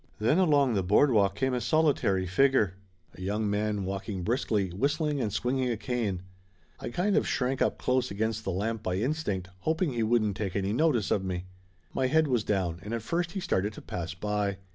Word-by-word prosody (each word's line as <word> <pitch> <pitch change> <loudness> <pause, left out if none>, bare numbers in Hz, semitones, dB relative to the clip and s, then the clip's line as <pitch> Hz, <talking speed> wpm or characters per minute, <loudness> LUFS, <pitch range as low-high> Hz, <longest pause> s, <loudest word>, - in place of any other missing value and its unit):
Then 120 - +2
along 145 -8 +4
the 100 - +1
boardwalk 100 0 +3
come 130 +3 0
a 125 - 0
solitary 120 -8 +2
figure 105 0 +3 0.4
a - - -12
young 105 +3 -1
man 105 -1 -1
walking 95 0 -4
briskly, 110 -3 0
whistling 145 - 0
and 110 -3 -1
swinging 125 +4 0
a 115 - -1
cane. 105 -5 -2 0.6
I - - -5
kind 185 +11 0
of - - +2
shrank 130 0 0
up - - +2
close 125 0 +1
against 110 +2 -2
the - - -3
lamp 105 +4 -2
by 90 -3 -2
instinct, 105 - -2
hoping 160 - 0
he 120 - -1
wouldn't 110 -3 +2
take 95 -4 -3
any 100 0 0
notice 125 -5 +2
of 95 - +2
me. 90 -1 -3 0.5
My 130 - +1
head 160 +3 +3
was 120 -5 +1
down 90 -5 -1
and 105 +4 -4
at 115 - -4
first 170 +8 -1
he 200 - -2
started 105 - 0
to - - -10
pass 90 +1 -5
by. 105 0 -1
110 Hz, 200 wpm, -28 LUFS, 100-130 Hz, 0.6 s, along